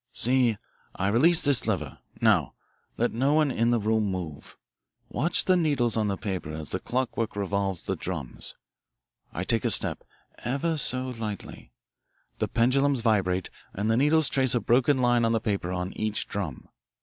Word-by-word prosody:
"See, 125 -3 +3 0.4
I 95 - -1
release 160 +10 +4
this 140 -6 +5
lever 80 -10 -3 0.2
now, - - +2 0.4
let - - +1
no 135 +6 +1
one 155 -3 +2
in 115 -1 +1
the 120 -1 +2
room 110 0 +1
move. 90 -6 -6 0.5
Watch 170 +5 0
the 185 - +4
needles 145 -9 +1
on 110 -2 0
the 100 -1 -2
paper 95 -6 -4
as 80 -1 -6
the - - -1
clockwork 120 -3 -2
revolves 100 -2 -2
the 95 - -2
drums. 80 -7 -5 0.8
I 85 - -4
take 115 +3 +1
a - - +1
step - - +1 0.4
ever 140 +7 -1
so 130 -1 +3
lightly. 110 - -7 0.7
The - - 0
pendulums 130 +3 +2
vibrate, 95 -5 0 0.2
and 105 +3 -1
the 115 - +2
needles 150 +3 +4
trace 130 -2 +2
a - - +2
broken 125 +5 +2
line 120 -1 +3
on 115 0 +2
the 115 - +2
paper 100 -5 -2
on 90 +1 -3
each 110 -1 -2
drum. 95 -10 -5
115 Hz, 170 wpm, -26 LUFS, 95-130 Hz, 0.8 s, this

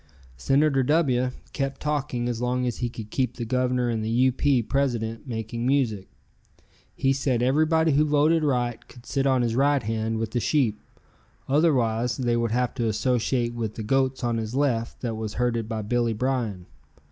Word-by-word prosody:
Senator 135 - +2
W 130 -3 +2 0.2
kept 135 -1 -3
talking 145 -5 -2
as 120 -1 -3
long 125 +1 0
as 120 -2 -2
he 120 - -2
could 110 -2 -9
keep 125 -3 -1
the 120 - -3
Governor 125 0 0
and 115 -2 -1
the 110 - -2
U. 125 +3 +3
P. 130 -1 +2
president 120 -2 -1
making 115 0 -4
music. 125 -7 0 0.9
He 135 0 +2
said 130 -3 0
everybody 155 +4 +3
who 145 +2 +4
voted 155 +2 +3
right 125 -5 -1
could 120 -1 -15
sit 135 -1 0
on 130 -2 +3
his 115 -1 0
right 140 +1 +2
hand 110 +1 -2
with 110 -1 -3
the 120 - 0
sheep, 120 -5 +1 0.7
otherwise 125 -6 +2
they 120 -3 0
would 115 0 0
have 125 +2 0
to 120 -3 -1
associate 120 +2 0
with 115 -3 -4
the 110 - -5
goats 130 +3 0
on 120 -1 0
his 110 +2 -4
left 125 -5 0
that 120 -3 -2
was 110 -1 -5
herded 115 -2 -1
by 110 -2 -3
Billy 120 +1 0
Bryan. 115 -6 -2
125 Hz, 180 wpm, -25 LUFS, 115-135 Hz, 0.9 s, who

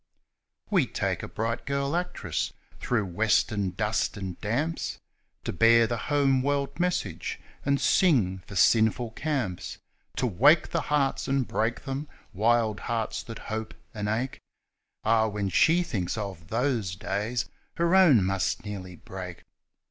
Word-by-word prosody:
41 - - 0
We - - +3
take - - -1
a - - -6
bright 115 +2 -3
girl 140 +2 0
actress 180 0 -2 0.3
through 115 -4 0
western 100 +1 +1
dust 105 +4 -1
and 95 -3 -6
damps, 145 +10 -1 0.5
To - - -3
bear 115 0 +6
the 120 +1 -2
home 140 -3 +3
world 140 +1 -1
message, 175 - -1 0.2
and 140 0 +2
sing 115 - +3
for 100 - -9
sinful 110 +3 +3
camps, 125 - -3 0.4
To 130 - 0
wake 135 - +4
the - - 0
hearts 145 -2 0
and 135 -2 +1
break 115 +2 -1
them, 140 +2 -3 0.3
wild 110 +1 +2
hearts 115 -1 -2
that 115 -2 -8 0.2
hope 110 0 -4 0.2
and 105 -2 -3
ache 120 +5 -2 0.6
(Ah! 110 0 +3
when 100 -2 -2
she 165 - +4
thinks 100 - -2
of 95 -6 -5
those 115 -5 0
days 105 +4 -2 0.3
her 170 +1 +1
own 165 - +6
must 95 +4 -1
nearly 95 -3 -6
break 90 +1 -8
115 Hz, 145 wpm, -27 LUFS, 100-140 Hz, 0.6 s, bear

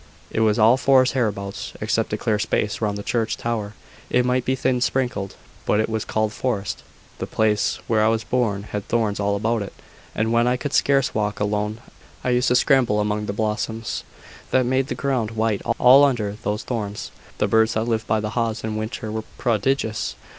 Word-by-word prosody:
"It - - -1
was 110 -1 +3
all 115 +3 +6
forest 130 -2 +4
hereabouts, 100 -6 -2
except - - 0
a - - 0
clear 105 -2 0
space 105 0 -1
round 105 -2 0
the 100 - -6
church 115 0 -1
tower. 110 -3 -3 0.3
It 125 0 +2
might 125 0 +1
be 130 - +1
thin 130 -1 0
sprinkled, 120 -7 -1 0.3
but 105 - +1
it 110 - +1
was 110 -1 -2
called 110 -1 -1
forest. 100 -7 -2 0.4
The - - -3
place 105 -1 +1
where 110 -2 +2
I - - +4
was 110 0 +1
born 110 -6 0
had 105 -1 -5
thorns 110 -4 0
all 100 0 +1
about 110 +2 0
it; 100 - -6 0.4
and 110 +1 0
when 120 +1 +3
I 125 0 +2
could 145 +2 -4
scarce 140 -1 +3
walk 105 -1 -1
alone, 105 +2 -1 0.4
I 125 - +1
used 125 +1 +2
to 125 - +3
scramble 125 -5 +3
among 105 0 -1
the - - -1
blossoms 110 +1 -2 0.5
that 130 -1 +3
made 130 +1 +1
the - - -3
ground 130 -6 -1
white 110 -2 +1 0.2
all 130 +3 +7
under 110 -7 +1
those 105 +1 -2
thorns. 105 -4 -4 0.3
The - - +1
birds 110 0 +3
that 110 - +1
lived 115 -2 -1
by 110 0 +2
the 105 0 -3
haws 115 -1 -1
in 110 -1 -3
winter 110 0 -4
were 110 0 -4
prodigious. 115 -1 0
110 Hz, 200 wpm, -22 LUFS, 105-125 Hz, 0.5 s, all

